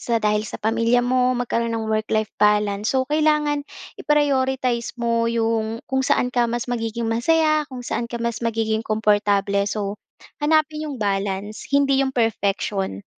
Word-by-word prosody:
sa 235 - 0
dahil 210 0 +2
sa - - -6
pamilya 230 +2 +2
mo? 255 0 +2
Magkaroon 235 -1 -1
ng 220 -1 -3
work-life 215 0 0
balance, 210 0 +2
so 260 0 +2
kailangan 300 -1 +2 0.4
i-prioritize 265 -5 +1
mo 230 -1 +1
'yong 225 -1 -1
kung 265 0 0
saan 250 -1 +1
ka 240 -1 +2
mas 240 0 -2
magiging 230 -1 -3
masaya, 310 +6 +2
kung 255 -2 -8
saan 235 0 -3
ka 235 - -4
mas 235 0 -2
magiging 225 -1 0
komportable. 205 -2 +1
So, 205 -1 -4 0.4
hanapin 310 0 +2
'yong 280 - -5
balance, 200 0 -2
hindi 275 -1 +3
'yong 265 -1 -1
perfection. 200 - -1
230 Hz, 150 wpm, -22 LUFS, 215-260 Hz, 0.4 s, hindi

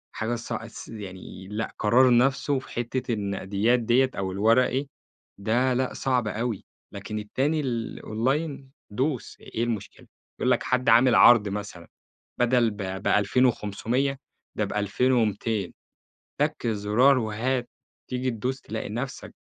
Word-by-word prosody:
حاجة 115 +2 -1
ص 115 0 -6
س 115 0 -7
يعني 95 -3 -9
لأ، 105 +2 -4
قرار 120 +3 +5
نفسه 135 +2 +2
في - - -14
حتّة 120 +1 -2
النقديات 100 +3 0
ديّة 120 +3 +2
أو 95 -1 -2
الوَرَقي، 125 +7 +2 0.5
ده 120 +6 +1
لأ 130 +1 -1
صعبة 125 -5 0
أوي، 115 -1 -3 0.3
لكن 105 +2 -5
التاني 135 +9 -1
ال 120 -5 -3
الonline 135 +6 -1 0.3
دوس 130 +4 -2
إيه 115 - -4
المشكلة؟ 115 -4 -5 0.3
يقول - - +2
لك - - +2
حد 130 0 +1
عامل 120 +2 +6
عرض 110 -4 +7
مثلًا 95 -4 -6 0.5
بَدَل 120 -2 +3
ب 105 - -10 0.3
ب2500، 125 +4 +1 0.4
ده - - 0
ب2200. 105 -2 0 0.7
تَك - - 0
زُرار 115 +5 +3
وهات، 120 +3 -1 0.4
تيجي 125 0 -1
تدوس 125 +4 -3
تلاقي 110 0 -5
نفسك 120 +6 -5
115 Hz, 130 wpm, -26 LUFS, 105-130 Hz, 0.7 s, عرض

